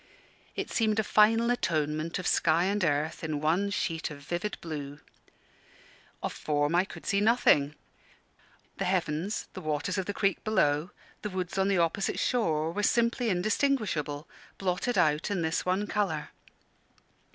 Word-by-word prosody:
It - - -4
seemed 220 -2 +1
a 220 - +3
final 225 +3 +4
atonement 155 -7 -1
of 185 - -5
sky 165 0 +3
and 200 +1 0
earth 155 +1 0
in 155 -2 -2
one 170 +7 +1
sheet 165 -5 -2
of 150 - -8
vivid 175 +7 -3
blue. 145 -3 -6 1.2
Of - - -2
form 145 +1 0
I 180 +2 +3
could - - -11
see 200 -1 +1
nothing; 180 -10 +4 1.0
the - - -1
heavens, 180 +2 -1
the - - -7
waters 155 +5 -1
of 185 - -3
the 205 - -2
creek 195 -1 0
below, 155 -6 +2 0.3
the 210 - -3
woods 185 -2 -4
on 190 - +3
the 200 -1 +2
opposite 170 +3 +1
shore 160 -10 +1
were 205 +4 -2
simply 235 +2 +2
indistinguishable 185 - 0 0.3
blotted 195 +5 -1
out 155 -1 +2
in 195 -4 -1
this 160 +3 -1
one 190 +3 +1
colour. 195 -8 -1
180 Hz, 150 wpm, -29 LUFS, 155-205 Hz, 1.2 s, final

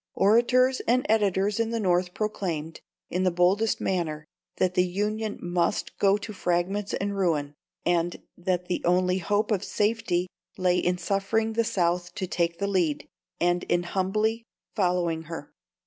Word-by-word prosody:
Orators 250 +5 +4
and 250 +2 +3
editors 205 -1 +2
in 230 -1 +1
the 230 0 -1
North 180 -2 +1
proclaimed, 175 -7 -3 0.3
in 180 - 0
the 185 - +3
boldest 185 +5 +2
manner, 155 -5 -2 0.3
that 185 -1 +1
the 180 - +3
Union 210 +3 -2
must 175 +3 -1
go 200 0 +4
to 215 +1 -7
fragments 185 +2 -1
and 200 +1 -2
ruin, 155 -7 0 0.3
and 175 0 +1 0.2
that 180 0 -1
the 180 - -2
only 180 +1 +2
hope 205 +4 0
of 200 -4 +1
safety 210 -4 0 0.3
lay 180 -1 +2
in 180 0 +1
suffering 200 +5 0
the 230 +1 +2
South 175 -3 0
to 185 - -2
take 170 -2 -1
the 200 - -1
lead, 175 -7 0 0.3
and 175 0 +2
in 175 0 +1
humbly 215 +5 0 0.3
following 175 -4 0
her. 165 -2 -8
185 Hz, 155 wpm, -26 LUFS, 175-210 Hz, 0.3 s, Orators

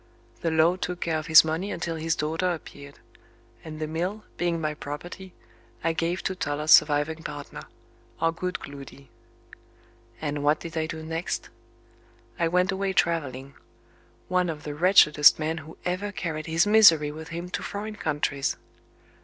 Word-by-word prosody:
The 165 - -1
law 160 +3 +3
took 180 -1 -4
care 160 -2 0
of 155 - -8
his 160 0 +8
money 165 +5 -2
until 170 -1 -3
his 160 0 -1
daughter 160 +4 -1
appeared; 140 -4 -9 0.7
and 155 -1 -8
the 155 - -2
mill, 180 +7 -3
being 175 -1 -1
my 155 -1 -2
property, 175 +6 -8 0.5
I 165 0 +1
gave 170 +2 -2
to 190 - -1
Toller's 150 -3 -2
surviving 150 +1 +5
partner 145 -2 -8 0.5
our 165 - +2
good 180 +2 -4
Gloody. 140 -2 -11 1.1
And 145 -1 -3
what 150 +1 +3
did 170 -1 -8
I 160 -1 -1
do 160 0 -6
next? 165 +2 -4 0.9
I 170 - +2
went 180 +3 +2
away 195 0 -1
travelling; 140 -7 -1 0.7
one 180 -1 +1
of 155 -2 -6
the 150 - -5
wretchedest 150 -3 +6
men 160 +1 -2
who 155 +1 -12
ever 185 +3 -2
carried 160 -5 -4
his 165 +3 +2
misery 185 -9 +6
with 160 +1 -9
him 170 +2 -6
to - - -3
foreign 210 +1 -5
countries. 145 -5 -1
160 Hz, 160 wpm, -26 LUFS, 150-180 Hz, 1.1 s, his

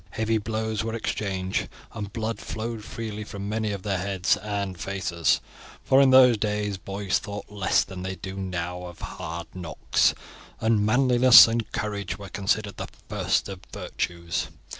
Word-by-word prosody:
Heavy 110 0 +1
blows 110 0 -2
were 115 0 -3
exchanged, 95 -4 -2 0.2
and 105 -3 -5
blood 115 +1 -3
flowed 110 0 -5
freely 110 -1 -5
from 100 -1 -6
many 110 0 -1
of 100 -2 -5
their 100 -3 -1
heads 95 -1 +1
and 100 -3 -4
faces, 85 -4 0 0.4
for 135 +1 +5
in 135 - +6
those 130 -3 +7
days 105 -1 -1
boys 95 +1 -1
thought 105 0 -7
less 100 -3 +2
than 95 -1 -8
they 95 +1 -4
do 95 +1 -7
now 90 -2 -4
of 85 -1 -9
hard 85 +1 -6
knocks, 85 -4 +1 0.4
and 110 -2 +2
manliness 125 +2 +8
and 115 0 -2
courage 105 -2 -3
were 100 -1 -9
considered 100 +1 -1
the - - -4 0.2
first - - 0
of 95 -2 -7
virtues. 85 -1 -3
105 Hz, 160 wpm, -26 LUFS, 95-110 Hz, 0.4 s, manliness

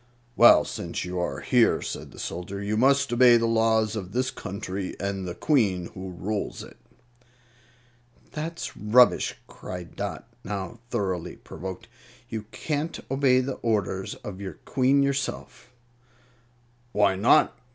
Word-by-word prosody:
"Well, - - +7
since - - -4
you 90 0 -4
are 85 -6 -2
here," - - +3
said - - -6
the - - -15
soldier, 90 +3 -5
"you 100 +1 -2
must 135 +3 +3
obey 120 0 +7
the 115 - +1
laws 110 -1 +2
of 95 -3 -6
this 130 +1 0
country 95 -1 -5
and 100 -1 -3
the 90 - -5
Queen 100 - +1
who 95 0 -7
rules 100 +4 -4
it." - - -14 1.5
"That's 165 +2 -5
rubbish!" 115 +4 +4
cried 90 -2 -9
Dot, - - -5 0.2
now 100 +3 -5
thoroughly 95 -6 -2
provoked. 95 +4 -8 0.4
"You 110 -2 -5
can't 150 +8 -3
obey 135 -1 +4
the 130 +1 -4
orders 100 -4 -1
of 100 -1 -7
your 95 - -5
Queen 135 +2 +3
yourself." 140 -2 -3 1.2
"Why 100 -2 +3
not?" 115 +10 +4
105 Hz, 135 wpm, -26 LUFS, 95-125 Hz, 1.5 s, Well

